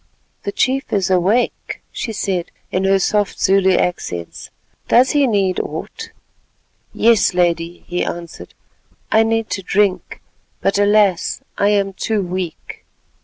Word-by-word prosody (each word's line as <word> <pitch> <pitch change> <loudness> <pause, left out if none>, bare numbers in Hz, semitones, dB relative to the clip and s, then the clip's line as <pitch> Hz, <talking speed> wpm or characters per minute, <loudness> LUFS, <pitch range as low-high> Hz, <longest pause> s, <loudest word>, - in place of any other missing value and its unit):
"The 200 - -1
chief 265 +5 0
is 190 -3 0
awake," 190 +7 0
she 235 - -4
said 190 -5 -2 0.2
in 185 +1 0
her 195 0 +4
soft 205 +1 0
Zulu 190 -1 +3
accents. 90 - -3 0.4
"Does 255 +2 +4
he 290 -2 +3
need 195 -5 +1
aught?" 450 -1 -6 0.8
"Yes, 225 -5 +3
Lady," 175 -1 0
he 180 0 -2
answered; 170 -1 -7 0.6
"I 220 - +5
need 225 0 0
to 195 - -2
drink, 195 0 0 0.4
but 195 +1 0
alas! 205 -3 +2
I 200 - +2
am 200 -1 +1
too 210 +1 -1
weak." 180 -2 -6
195 Hz, 130 wpm, -18 LUFS, 180-215 Hz, 0.8 s, I